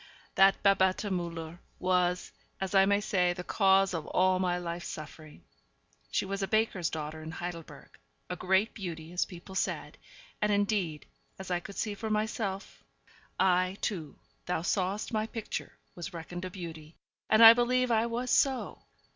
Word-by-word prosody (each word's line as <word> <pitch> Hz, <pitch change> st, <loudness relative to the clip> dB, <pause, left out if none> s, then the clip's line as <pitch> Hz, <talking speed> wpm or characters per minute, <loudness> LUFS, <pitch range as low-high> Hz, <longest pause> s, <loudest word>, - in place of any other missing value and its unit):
That 195 Hz, 0 st, +4 dB
Babette 195 Hz, 0 st, +3 dB
Müller 170 Hz, -1 st, -4 dB, 0.2 s
was, 180 Hz, -1 st, +1 dB, 0.3 s
as 190 Hz, 0 st, -3 dB
I 195 Hz, 0 st, +6 dB
may 200 Hz, 0 st, +3 dB
say, 180 Hz, -3 st, +1 dB
the 180 Hz, 0 st, -6 dB
cause 195 Hz, 0 st, +3 dB
of 165 Hz, -3 st, -4 dB
all 185 Hz, 0 st, +2 dB
my 180 Hz, -1 st, +1 dB
life's 175 Hz, 0 st, -5 dB
suffering. 155 Hz, -, -9 dB, 0.7 s
She -, -, 0 dB
was 195 Hz, +1 st, -3 dB
a 195 Hz, -, 0 dB
baker's 215 Hz, -6 st, +1 dB
daughter 155 Hz, 0 st, -5 dB
in 155 Hz, -, -7 dB
Heidelberg 165 Hz, -3 st, -8 dB, 0.3 s
a 180 Hz, -, -4 dB
great 190 Hz, +4 st, +1 dB
beauty, 170 Hz, -5 st, -6 dB
as 180 Hz, -, +1 dB
people 180 Hz, 0 st, -11 dB
said, 190 Hz, -, -3 dB, 0.4 s
and, 210 Hz, 0 st, +2 dB
indeed, 200 Hz, -6 st, 0 dB, 0.3 s
as 190 Hz, -1 st, -7 dB
I 175 Hz, -, +1 dB
could 195 Hz, +3 st, -10 dB
see 210 Hz, -, -2 dB
for 220 Hz, +2 st, -5 dB
myself 210 Hz, -2 st, -2 dB, 0.6 s
I, 185 Hz, 0 st, +2 dB
too 165 Hz, -9 st, -3 dB, 0.3 s
thou 175 Hz, -2 st, -1 dB
sawest 195 Hz, +5 st, -1 dB
my 215 Hz, 0 st, 0 dB
picture 225 Hz, -1 st, -5 dB, 0.2 s
was 175 Hz, +1 st, -7 dB
reckoned 175 Hz, +2 st, -6 dB
a -, -, -4 dB
beauty, 165 Hz, -4 st, -9 dB, 0.3 s
and 220 Hz, +1 st, +6 dB
I 225 Hz, -, +13 dB
believe 250 Hz, +1 st, +1 dB
I 225 Hz, 0 st, +3 dB
was 240 Hz, +2 st, -2 dB
so. 265 Hz, -2 st, +1 dB
185 Hz, 165 wpm, -30 LUFS, 175-205 Hz, 0.7 s, I